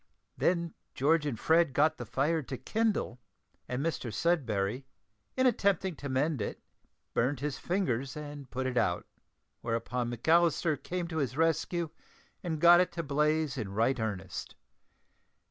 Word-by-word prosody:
Then 170 -2 +1 0.2
George 150 +3 +3
and 120 -6 -3
Fred 165 -3 +3
got 155 +3 +3
the - - -6
fire 155 +4 +1
to 130 -1 -6
kindle, 215 - -1 0.5
and 125 +4 -2
Mr 135 -7 -2
Sudberry, 125 - 0 0.5
in 260 - +3
attempting 195 -6 +2
to 140 - -6
mend 135 0 0
it, - - -4 0.5
burnt 125 +3 +1
his 145 -1 -2
fingers 140 - -1
and 145 -3 -8
put 130 +1 -3
it 130 -1 -1
out; 90 -5 +1 0.6
whereupon 120 +1 -2
McAllister 160 +3 +2
came 180 -1 -3
to 160 - -4
his 135 -3 -1
rescue 165 0 +1 0.5
and 165 -3 -3
got 175 +2 +8
it 180 - +2
to 170 - -3
blaze 150 -1 +1
in 100 -4 -4
right 115 +5 +2
earnest. 95 -4 -4
145 Hz, 145 wpm, -31 LUFS, 125-165 Hz, 0.6 s, got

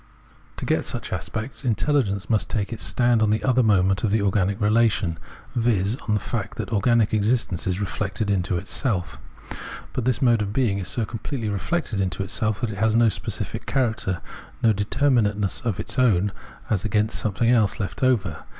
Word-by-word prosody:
To - - -4
get - - +1
such - - -4
aspects, 115 +6 -5
intelligence 110 -5 0
must 110 -2 0
take 105 0 -2
its 115 - -7
stand 120 -2 +2
on 110 - +3
the 110 +1 +1
other 130 -1 +3
moment 100 -3 +3
of 110 - +2
the 105 0 +1
organic 100 0 +1
relation, 105 -6 +2 0.4
viz. 115 -3 +1
on 105 - +2
the - - +1
fact 110 -2 -4
that - - -4
organic 110 +1 +3
existence 105 -4 +1
is 90 0 0
reflected 100 +1 -2
into 90 -2 0
itself. 95 +1 -1 0.7
But 125 - -2
this 125 -3 +1
mode 120 -4 +3
of 100 -1 -3
being 110 -5 +1
is 95 - -5
so 115 - -1
completely 115 +1 -4
reflected 105 - -1
into 95 +1 -2
self 110 +3 0
that 120 -3 -1
it 100 - -7
has 110 0 +2
no 115 -1 +5
specific - - -3
character, 110 - 0 0.4
no 115 -2 +5
determinate 105 0 +1
ness 100 -3 0
of 110 -5 -2
its 115 - -2
own 105 -6 +3 0.4
as 100 -4 0
against 110 0 0
something 115 +3 +1
else, 110 -5 +2
left 100 - -4
over. 115 - +1
110 Hz, 185 wpm, -24 LUFS, 100-120 Hz, 0.7 s, no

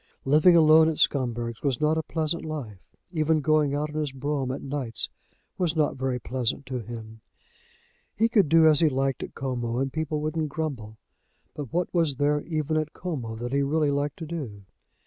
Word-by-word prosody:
Living 155 +6 +6
alone 160 0 +7
at 160 - -3
Scumberg's 120 -4 0
was 135 -4 0
not 155 +1 +2
a 160 - 0
pleasant 160 +1 -2
life. 140 -11 -6 0.3
Even 160 -2 +2
going 150 -1 +2
out 150 +1 -1
in 155 - -3
his 150 -2 -1
brougham 135 0 -2
at 130 - -4
nights 135 -4 -3 0.5
was 170 -3 +1
not 150 -2 +1
very 130 -1 -1
pleasant 125 +2 -3
to 130 -1 -4
him. 110 -1 -9 0.9
He 225 - +3
could 205 -9 +3
do 160 0 +6
as 155 -2 +5
he 160 - +4
liked 135 0 -1
at - - -7
Como, 120 -3 -2
and 135 +1 -1
people 155 -1 -2
wouldn't 155 0 -2
grumble; 130 -9 -4 0.6
but 145 -5 -7
what 175 +1 -1
was 165 -5 +2
there 145 +2 +1
even 155 -1 -1
at 155 -1 -2
Como 130 -11 -4
that 120 +3 -5
he 140 - +2
really 145 +1 +1
liked 145 0 -1
to 165 - -6
do? 135 -12 -6
145 Hz, 190 wpm, -26 LUFS, 130-155 Hz, 0.9 s, alone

